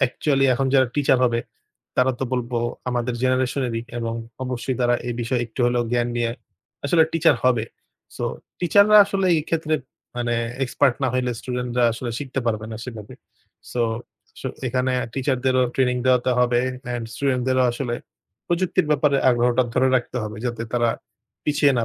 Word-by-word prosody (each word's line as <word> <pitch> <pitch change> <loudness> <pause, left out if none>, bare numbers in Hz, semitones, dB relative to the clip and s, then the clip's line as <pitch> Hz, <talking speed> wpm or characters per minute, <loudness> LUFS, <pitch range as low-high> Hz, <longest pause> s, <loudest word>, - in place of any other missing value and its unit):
Actually 135 +1 +1
এখন 135 +2 0
যারা 130 -1 +5
teacher 135 -2 +3
হবে 115 -1 +1 0.6
তারা 130 +1 +3
তো 135 - -1
বলবো 120 -1 -1 0.3
আমাদের 120 0 -1
জেনারেশনেরই 130 -2 0 0.2
এবং 115 -1 -2 0.3
অবশ্যই 125 0 -3
তারা 120 0 +3
এই 120 - -2
বিষয়ে 120 +1 0
একটু 110 +3 -7
হলেও 120 0 +1
জ্ঞান 120 0 +1
নিয়ে 120 -1 0 0.5
আসলে 160 +3 +4
টিচার 165 -4 +4
হবে। 120 -3 +3 0.5
সো - - -3 0.4
টিচাররা 200 +4 +5
আসলে 195 -1 0
এই 155 - 0
ক্ষেত্রে 160 -1 0 0.4
মানে 120 -1 0 0.3
এক্সপার্ট 130 0 +2
না 130 - +3
হইলে 125 -1 0
স্টুডেন্টরা 125 -1 -1
আসলে 120 +1 -4
শিখতে 135 -2 -3
পারবেনা 110 0 -2
সেভাবে। 110 -5 -8 0.6
সো 120 - 0 0.6
স - - -12 0.3
এখানে 130 +1 0 0.2
টিচারদেরও 130 -1 +1
ট্রেনিং 125 -1 +2
দেওয়াতে 125 0 +3
হবে 120 -1 +3 0.3
অ্যান্ড 120 -1 -3
স্টুডেন্টদেরও 130 -1 +1
আসলে 120 -1 -3 0.5
প্রযুক্তির 175 -1 +1
ব্যাপারে 145 -1 +3
আগ্রহটা 120 +1 +3
ধরে 130 +1 +3
রাখতে 125 +1 -3
হবে, 105 0 -5
যাতে 115 -1 -3
তারা 120 -1 +2 0.5
পিছিয়ে 145 -1 +3
না 115 - +1
125 Hz, 155 wpm, -23 LUFS, 120-135 Hz, 0.6 s, যারা